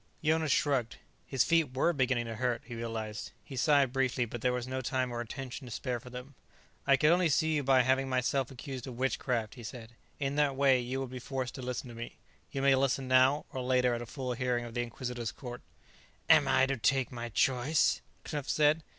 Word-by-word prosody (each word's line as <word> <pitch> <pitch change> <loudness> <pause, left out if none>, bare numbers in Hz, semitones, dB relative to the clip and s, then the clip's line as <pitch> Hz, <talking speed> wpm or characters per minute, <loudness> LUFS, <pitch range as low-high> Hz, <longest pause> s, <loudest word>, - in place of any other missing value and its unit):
Jonas 160 -1 +2
shrugged. 135 -6 +1 0.3
His 135 -3 +2
feet 165 -6 +2
were 170 +6 +3
beginning 130 -4 +1
to 115 - -5
hurt, 120 -1 -1
he 120 - -8
realized; 110 -2 -5
he 135 - -9
sighed 140 -1 +3
briefly, 130 -2 +1
but 120 0 -7
there 125 - +2
was 125 0 -3
no 130 0 -3
time 130 0 -1
or 120 0 -3
attention 130 +2 -7
to - - -9
spare 125 +1 -3
for 125 - -12
them. 125 +3 -9 0.5
"I 135 - +6
could 150 +4 +4
only 175 -1 +3
see 160 +2 +2
you 150 -2 +1
by 130 -1 +5
having 135 +1 +2
myself 130 0 0
accused 135 0 -7
of 125 -2 -7
witchcraft," 125 -3 -1
he 125 - -11
said. 115 0 -8 0.3
"In 140 0 -1
that 145 -2 +2
way, 135 -1 +4
you 125 +2 -3
would 130 -2 -5
be 130 - -6
forced 130 0 -4
to 130 - -7
listen 125 +1 -4
to - - -9
me. 115 +1 -8 0.3
You 135 - -3
may 140 0 +6
listen 135 0 +1
now, 130 +3 +4
or 130 - -3
later 125 -1 +2
at 120 - -2
a 120 - -7
full 130 0 -4
hearing 120 -1 -1
of 115 - -9
the 120 - 0
Inquisitor's 120 -1 -4
Court." 125 -2 -8 0.7
"And 140 - +6
I 135 0 +4
am - - +4
to 135 - 0
take 135 +2 +1
my 120 -1 -5
choice?" 130 +6 +2 0.2
Knupf 145 -2 -4
said. 150 +1 +3
130 Hz, 225 wpm, -31 LUFS, 120-135 Hz, 0.7 s, I